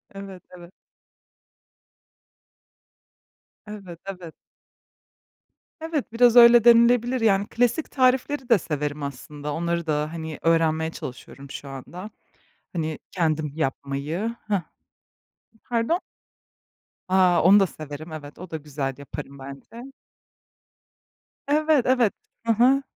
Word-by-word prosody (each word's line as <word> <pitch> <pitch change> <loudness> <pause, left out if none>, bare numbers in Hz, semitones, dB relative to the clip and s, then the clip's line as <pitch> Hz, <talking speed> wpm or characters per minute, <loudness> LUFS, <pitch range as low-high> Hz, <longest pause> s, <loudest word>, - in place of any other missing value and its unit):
Evet, 195 -2 -9
evet. 175 +1 -13 3.0
Evet, 195 -5 -9
evet. 180 -4 -8 1.5
Evet, 320 -7 -3
biraz 240 0 +5
öyle 235 -1 +9
denilebilir. 240 +1 +5
Yani 200 -2 +2
klasik 245 +6 0
tarifleri 260 +1 +1
de 230 - +6
severim 150 -2 -3
aslında. 145 +2 -6
Onları 170 0 -2
da, 150 +1 -1
hani, 160 -2 -6
öğrenmeye 160 -1 +2
çalışıyorum 135 0 -9
şu 140 - -8
anda. 175 +9 -8 0.6
Hani, 160 -3 -3
kendim 155 -4 -1
yapmayı. 150 - -3
Hıh. 200 -4 +1 1.0
Pardon? 240 +9 0 1.1
A! 185 -2 +4
Onu 200 +3 +7
da 195 - +3
severim. 155 0 -9
Evet, 145 -2 -9
o 185 0 -9
da 160 - -3
güzel 140 -2 -4
yaparım 140 0 -9
bence. 175 - -10 1.6
Evet, 300 -2 +3
evet. 250 -5 +3 0.3
Hı 230 - +3
hı. 255 +5 +4
180 Hz, 105 wpm, -24 LUFS, 150-235 Hz, 3.0 s, öyle